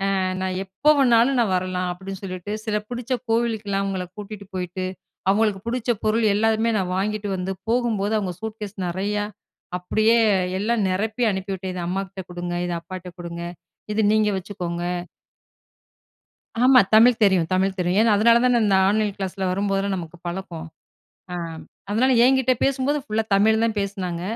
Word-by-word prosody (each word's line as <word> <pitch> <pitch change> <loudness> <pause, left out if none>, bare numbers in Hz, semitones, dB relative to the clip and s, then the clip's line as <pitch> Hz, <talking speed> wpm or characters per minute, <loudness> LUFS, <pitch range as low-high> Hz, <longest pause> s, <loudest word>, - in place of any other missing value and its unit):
அ 190 - +1 0.2
நா 190 - 0 0.2
எப்ப 240 +11 +3
வேணாலும் 250 0 +4
நா 235 - +4
வரலாம்." 180 0 -1
அப்படீன்னு 190 +2 -7
சொல்லிட்டு. 185 +2 -5
சில 210 -2 0
பிடிச்ச 245 +1 -3 0.2
கோவிலுக்கல்லாம் 220 -4 0
அவங்கள 190 -2 -2
கூட்டிட்டு 205 -1 -8
போயிட்டு, 185 +1 -3 0.4
அவங்களுக்கு 205 -1 +2
புடிச்ச 240 0 0
பொருள் 220 +1 +2
எல்லாமே 225 +1 +2
நான் 180 -1 -2
வாங்கிட்டு 205 +1 -2
வந்து, 185 +1 -3 0.2
போகும்போது 225 -4 +1
அவங்க 185 -3 -3
சூட்கேஸ் 215 -2 -6
நெறையா, 205 +4 -1 0.5
அப்படியே 215 +5 +2 0.4
எல்லாம் 215 -1 +1
நெரப்பி 215 +6 -1
அனுப்பிவிட்டேன். 190 -1 -4
இத 180 - -3
அம்மாகிட்ட 190 +1 -4
குடுங்க. 175 0 -4
இத 175 - -2
அப்பாட்ட 185 +1 -8
குடுங்க. 170 0 -6 0.5
இத 220 - +1
நீங்க 215 -1 +3
வச்சுக்கோங்க. 175 -2 -4 1.8
ஆமா. 255 0 +8
தமிழ் 230 +1 +6
தெரியும், 185 -5 +3
தமிழ் 190 +1 +1
தெரியும். 180 +2 +1
ஏன்னா, 225 -2 +4
அதனால 230 +3 +5
தான 245 -2 +4
இந்த 195 -2 +3
ஆன்லைன் 210 0 +1
கிளாஸில, 190 -1 -3
வரும்போதெல்லாம் 195 0 0
நமக்கு 170 0 -8
பழக்கம். 175 -2 -5 0.7
அ - - -2 0.6
அதனால 250 +5 +3
என்கிட்ட 265 -1 +3
பேசும்போது, 275 +2 +1
ஃபுல்லா 220 -3 0
தமிழ்ல 220 +2 +3
தான் 220 -2 -2
பேசுனாங்க. 185 -4 -3
200 Hz, 150 wpm, -23 LUFS, 185-225 Hz, 1.8 s, ஆமா